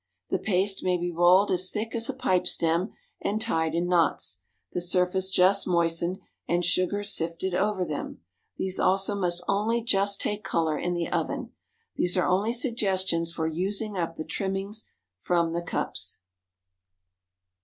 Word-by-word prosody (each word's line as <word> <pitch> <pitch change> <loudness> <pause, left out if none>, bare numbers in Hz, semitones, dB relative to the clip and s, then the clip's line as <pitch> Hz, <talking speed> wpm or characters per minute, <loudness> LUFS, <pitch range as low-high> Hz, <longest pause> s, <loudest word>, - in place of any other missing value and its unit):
The - - 0
paste 195 0 +1
may 180 -1 +2
be 175 0 -2
rolled 175 +4 +5
as 185 0 +1
thick 220 +1 -4
as 230 -1 -1
a - - -1
pipe 185 -9 +1
stem 170 +5 +1 0.3
and 210 +2 -1
tied 165 -8 0
in 170 +1 0
knots, 165 - +1 0.3
the 180 - -1
surface 180 +1 +1
just 190 +2 +4
moistened, 170 0 +1 0.3
and 175 0 +1
sugar 185 +3 +1
sifted 170 -1 -1
over 190 0 +1
them; 150 -3 -5 0.4
these 190 0 -2
also 195 +1 +3
must 175 -3 -1
only 220 +4 +1
just 200 -2 +2
take 210 0 -2
color 165 -5 0
in 175 +2 -2
the 170 -1 -1
oven. - - -2 0.5
These 180 +1 +1
are 180 - +2
only 200 +5 +2
suggestions 190 - 0
for 165 -1 -3
using 195 +6 -1
up 165 -2 -2
the 155 - -5
trimmings 195 +5 -3 0.3
from 170 - +1
the 170 - -1
cups. 170 - -2
185 Hz, 155 wpm, -27 LUFS, 170-200 Hz, 0.5 s, rolled